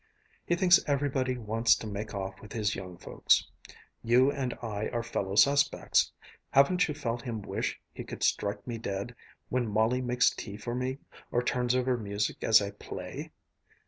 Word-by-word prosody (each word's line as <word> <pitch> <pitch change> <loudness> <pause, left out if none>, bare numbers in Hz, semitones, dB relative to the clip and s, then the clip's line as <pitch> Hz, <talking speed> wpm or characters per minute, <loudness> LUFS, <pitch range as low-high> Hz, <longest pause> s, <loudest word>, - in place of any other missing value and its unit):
He 175 - +3
thinks 175 0 +6
everybody 135 -3 0
wants 115 0 +3
to - - -7
make 105 0 -5
off 95 -1 -5
with 105 - -11
his 105 -2 0
young 90 -2 -7
folks. - - +2 0.5
You 125 +4 +4
and 130 -3 -3
I 110 -2 -3
are 120 -1 -2
fellow 100 -4 -3
suspects. 140 +7 +3 0.4
Haven't 180 +7 +4
you 150 - -4
felt 120 -5 -3
him 115 -4 -5
wish - - -3
he - - -7
could - - -7
strike 100 0 0
me 120 -2 -4
dead, 100 +2 -4 0.4
when 125 -2 0
Molly 110 +4 +2
makes 125 0 +3
tea 100 -1 -7
for 120 +2 -5
me, 130 +2 -2 0.3
or 120 - 0
turns 125 0 +1
over 130 0 +1
music 105 -1 -2
as 110 -2 +6
I 100 - -4
play?" 100 - -7
120 Hz, 175 wpm, -29 LUFS, 105-130 Hz, 0.5 s, thinks